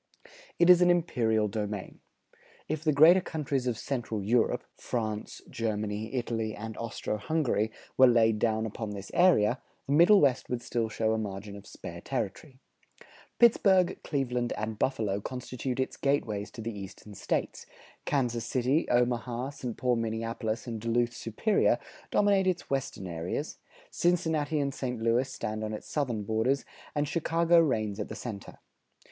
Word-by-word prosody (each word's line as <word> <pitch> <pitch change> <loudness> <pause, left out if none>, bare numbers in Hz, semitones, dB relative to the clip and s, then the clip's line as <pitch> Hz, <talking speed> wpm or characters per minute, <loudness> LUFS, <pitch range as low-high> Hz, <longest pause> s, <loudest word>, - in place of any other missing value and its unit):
It 170 - +4
is 180 0 +7
an 180 - +5
imperial 115 -11 +2
domain. 105 -2 -4 0.7
If 155 0 -3
the 155 - +3
greater 160 +6 +7
countries 140 -6 -2
of 120 -3 0
Central 115 -5 -3
Europe, 115 +3 +2
France, 110 -3 -4
Germany, 110 0 -3
Italy, 115 -3 -2
and 110 +1 -6
Austro 115 -2 -3
Hungary, 120 -4 0 0.3
were 130 - +9
laid 115 -3 +4
down 110 0 +1
upon 110 0 -5
this 100 -1 -7
area, 130 - +4 0.2
the 140 - -1
Middle 175 +7 +7
West 135 -5 +2
would 120 -1 -3
still 115 -2 -1
show 110 0 0
a 110 - 0
margin 100 -1 -5
of 100 - -12
spare - - -9
territory. 130 - -4 0.8
Pittsburgh, 195 -6 +4
Cleveland, 125 -4 -1
and 110 0 -4
Buffalo 105 -6 0
constitute 125 +1 -4
its 130 - -2
gateways 110 -7 0
to 115 - -9
the 115 0 -4
Eastern 100 +1 -9
States; - - -3 0.4
Kansas 120 -5 0
City, 130 +5 +1
Omaha, 120 +1 0
St. 125 -5 -6
Paul 125 -2 +1
Minneapolis, 115 0 -3
and 115 -3 -5
Duluth 120 +1 +1
Superior 155 - +1 0.3
dominate 200 -2 +3
its 180 -5 -1
western 125 -7 -2
areas; 85 -1 -4 0.3
Cincinnati 160 -4 +1
and 140 -1 -1
St. 125 -3 -3
Louis 115 +4 +1
stand 110 0 -4
on 110 0 -3
its 105 - -7
southern 125 -8 -1
borders; 110 +6 0 0.3
and 145 0 +1
Chicago 170 +2 +3
reigns 110 -10 +1
at 105 - -4
the - - -6
center. 110 -5 -7
120 Hz, 150 wpm, -29 LUFS, 110-140 Hz, 0.8 s, were